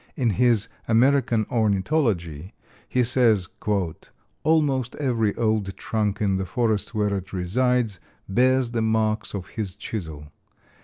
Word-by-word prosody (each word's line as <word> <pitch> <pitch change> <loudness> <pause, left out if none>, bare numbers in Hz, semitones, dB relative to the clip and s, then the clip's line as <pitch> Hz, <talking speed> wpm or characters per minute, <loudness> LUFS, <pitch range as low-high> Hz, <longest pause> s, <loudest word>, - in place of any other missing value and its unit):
In 125 -7 +1
his 115 0 +2 0.2
"American 120 -1 +3
Ornithology" 100 - 0 0.3
he 125 - +2
says: 115 -6 +3 0.9
"Almost 140 -6 +1
every 115 -7 0
old 110 -4 -1
trunk 105 -2 -1
in 100 -2 +1
the 95 - -2
forest 110 +2 -1
where 105 -1 +1
it 95 -1 -6
resides 110 +3 0 0.3
bears 125 +4 +2
the 115 -1 -1
marks 110 -1 0
of 90 -2 -6
his 100 -5 -4
chisel. 80 -9 -6
110 Hz, 120 wpm, -24 LUFS, 100-125 Hz, 0.9 s, American